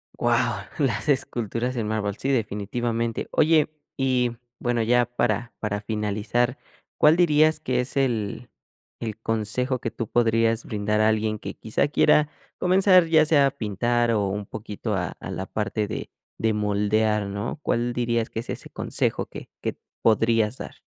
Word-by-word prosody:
Wao, 120 Hz, 0 st, +1 dB, 0.2 s
las 135 Hz, -1 st, 0 dB
esculturas 125 Hz, -2 st, 0 dB
en 115 Hz, -3 st, -2 dB
mármol. 105 Hz, -1 st, -2 dB
Sí, 135 Hz, -, -2 dB
definitivamente. 115 Hz, 0 st, -1 dB
Oye, 155 Hz, -1 st, +4 dB, 0.3 s
y 130 Hz, -2 st, +1 dB, 0.3 s
bueno, 120 Hz, -1 st, 0 dB
ya 120 Hz, +2 st, +3 dB
para- 120 Hz, -1 st, -1 dB
para 105 Hz, -1 st, -2 dB
finalizar, 110 Hz, +4 st, -1 dB, 0.4 s
¿cuál 150 Hz, +1 st, +6 dB
dirías 155 Hz, -2 st, +4 dB
que 130 Hz, -5 st, 0 dB
es 125 Hz, +2 st, -4 dB
el- 115 Hz, -7 st, -1 dB, 0.5 s
el 110 Hz, -2 st, -5 dB
consejo 115 Hz, +4 st, -1 dB
que 115 Hz, -, -3 dB
tú 115 Hz, -, -4 dB
podrías 115 Hz, -1 st, +2 dB
brindar 105 Hz, 0 st, 0 dB
a 110 Hz, -, +5 dB
alguien 110 Hz, 0 st, 0 dB
que -, -, -7 dB
quizá 110 Hz, +5 st, -1 dB
quiera 150 Hz, 0 st, +4 dB, 0.3 s
comenzar, 185 Hz, 0 st, +5 dB
ya 160 Hz, -1 st, +4 dB
sea 145 Hz, -3 st, +5 dB
a 135 Hz, -, +2 dB
pintar 120 Hz, 0 st, 0 dB
o 105 Hz, -3 st, +1 dB
un 100 Hz, +1 st, -4 dB
poquito 105 Hz, 0 st, -4 dB
a- 90 Hz, -3 st, -1 dB
a -, -, -7 dB
la 95 Hz, -, -4 dB
parte 105 Hz, +1 st, -2 dB
de- -, -, -5 dB, 0.3 s
de 110 Hz, 0 st, +1 dB
moldear, 105 Hz, 0 st, +1 dB
no? 100 Hz, +9 st, -4 dB
¿Cuál 120 Hz, -2 st, 0 dB
dirías 120 Hz, -1 st, 0 dB
que -, -, -4 dB
es 115 Hz, -, -7 dB
ese -, -, -6 dB
consejo -, -, -1 dB
que -, -, -10 dB
que -, -, -2 dB, 0.3 s
podrías 115 Hz, +1 st, +3 dB
dar? -, -, -8 dB
115 Hz, 160 wpm, -25 LUFS, 105-125 Hz, 0.5 s, cuál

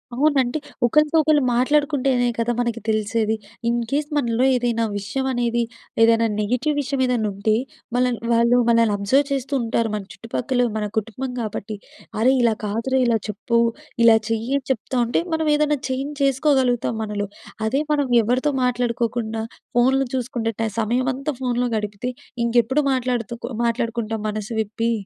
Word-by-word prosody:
అవును. 290 Hz, +3 st, +3 dB
అంటే 250 Hz, +5 st, -2 dB, 0.3 s
ఒకళ్ళతో 300 Hz, +5 st, +3 dB
ఒకళ్ళు 305 Hz, -1 st, +4 dB
మాట్లాడుకుంటేనే 270 Hz, -1 st, +2 dB
కదా! 230 Hz, +1 st, 0 dB
మనకి 235 Hz, -1 st, -1 dB
తెలిసేది. 215 Hz, +1 st, +1 dB, 0.3 s
ఇన్‌కేస్ 240 Hz, +5 st, -1 dB
మనలో 240 Hz, -2 st, +1 dB
ఏదైనా 240 Hz, -2 st, 0 dB
విషయం 205 Hz, +7 st, -3 dB
అనేది 240 Hz, -1 st, 0 dB, 0.4 s
ఏదైనా 230 Hz, 0 st, +4 dB
నెగెటివ్ 250 Hz, +8 st, 0 dB
విషయం 275 Hz, -1 st, -2 dB
ఏదైనా 245 Hz, -4 st, 0 dB
ఉంటే, 200 Hz, +2 st, 0 dB, 0.4 s
మన 250 Hz, -, +3 dB, 0.3 s
వాళ్ళు 235 Hz, +1 st, +4 dB
మనల్ని 230 Hz, -2 st, +4 dB
అబ్జర్వ్ 265 Hz, +8 st, +2 dB
చేస్తూ 275 Hz, +1 st, -2 dB
ఉంటారు. 230 Hz, 0 st, 0 dB
మన 210 Hz, -, -4 dB
చుట్టుపక్కల 245 Hz, +2 st, -1 dB
మన 210 Hz, -, -1 dB
కుటుంబం 225 Hz, +4 st, -3 dB
కాబట్టి 215 Hz, -1 st, -4 dB, 0.4 s
అరేయ్! 260 Hz, +4 st, +4 dB
ఇలా 235 Hz, -2 st, +3 dB
కాదురా 230 Hz, +6 st, 0 dB
ఇలా 235 Hz, -2 st, +3 dB
చెప్పు 215 Hz, +3 st, -1 dB, 0.5 s
ఇలా 230 Hz, -1 st, +8 dB
చెయ్యి 225 Hz, +2 st, -2 dB
అని 270 Hz, -, -7 dB
చెప్తా 260 Hz, +1 st, -3 dB
ఉంటే 235 Hz, -, +1 dB
మనం 320 Hz, 0 st, 0 dB
ఏదన్నా 300 Hz, 0 st, +2 dB
చేంజ్ 270 Hz, +3 st, -2 dB
చేసుకోగలుగుతాం 265 Hz, -4 st, +2 dB
మనలో. 205 Hz, -1 st, -3 dB, 0.4 s
అదే 270 Hz, +6 st, +1 dB
మనం 290 Hz, -2 st, +1 dB, 0.2 s
ఎవరితో 255 Hz, +6 st, +1 dB
మాట్లాడుకోకుండా 235 Hz, -2 st, -1 dB, 0.3 s
ఫోన్లు 265 Hz, +2 st, +3 dB
చూసుకుంటే. 250 Hz, -1 st, -3 dB, 0.4 s
సమయమంతా 255 Hz, +6 st, 0 dB
ఫోన్‍లో 245 Hz, -1 st, 0 dB
గడిపితే, 210 Hz, +3 st, -4 dB, 0.4 s
ఇంకెప్పుడు 240 Hz, +4 st, +2 dB
మాట్లాడుతు 245 Hz, -3 st, -1 dB, 0.3 s
మాట్లాడుకుంటాం 230 Hz, -2 st, -1 dB
మనసు 215 Hz, +1 st, -4 dB
విప్పి. 225 Hz, +2 st, -2 dB
240 Hz, 140 wpm, -22 LUFS, 225-265 Hz, 0.5 s, ఇలా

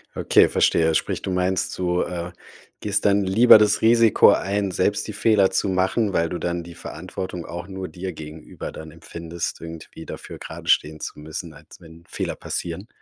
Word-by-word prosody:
Okay, -, -, +4 dB
verstehe. 80 Hz, -1 st, +3 dB
Sprich, -, -, -1 dB
du 95 Hz, -, -3 dB
meinst, 90 Hz, +1 st, -1 dB
du, 90 Hz, -1 st, 0 dB
äh, 90 Hz, 0 st, -4 dB, 0.5 s
gehst 105 Hz, -1 st, -1 dB
dann 100 Hz, 0 st, +4 dB
lieber 110 Hz, +5 st, +7 dB
das 105 Hz, -1 st, +3 dB
Risiko 115 Hz, -1 st, +6 dB
ein, 100 Hz, 0 st, 0 dB
selbst 105 Hz, +4 st, 0 dB
die 110 Hz, -, -5 dB
Fehler 105 Hz, -2 st, +3 dB
zu 100 Hz, -, 0 dB
machen, 95 Hz, +3 st, +1 dB
weil 85 Hz, -2 st, +1 dB
du 90 Hz, -, -4 dB
dann 85 Hz, 0 st, -3 dB
die 85 Hz, 0 st, -11 dB
Verantwortung 90 Hz, +1 st, -7 dB
auch 85 Hz, +1 st, -7 dB
nur 95 Hz, -1 st, -6 dB
dir 90 Hz, +4 st, -6 dB
gegenüber 80 Hz, 0 st, -9 dB
dann 80 Hz, 0 st, -9 dB
empfindest, 85 Hz, +1 st, -6 dB
irgendwie 80 Hz, -1 st, -9 dB
dafür -, -, -8 dB
geradestehen 80 Hz, +1 st, -1 dB
zu -, -, -6 dB
müssen, 75 Hz, 0 st, -7 dB
als -, -, -16 dB
wenn 80 Hz, 0 st, -15 dB
Fehler -, -, -3 dB
passieren? 90 Hz, +5 st, -5 dB
90 Hz, 175 wpm, -23 LUFS, 85-100 Hz, 0.5 s, lieber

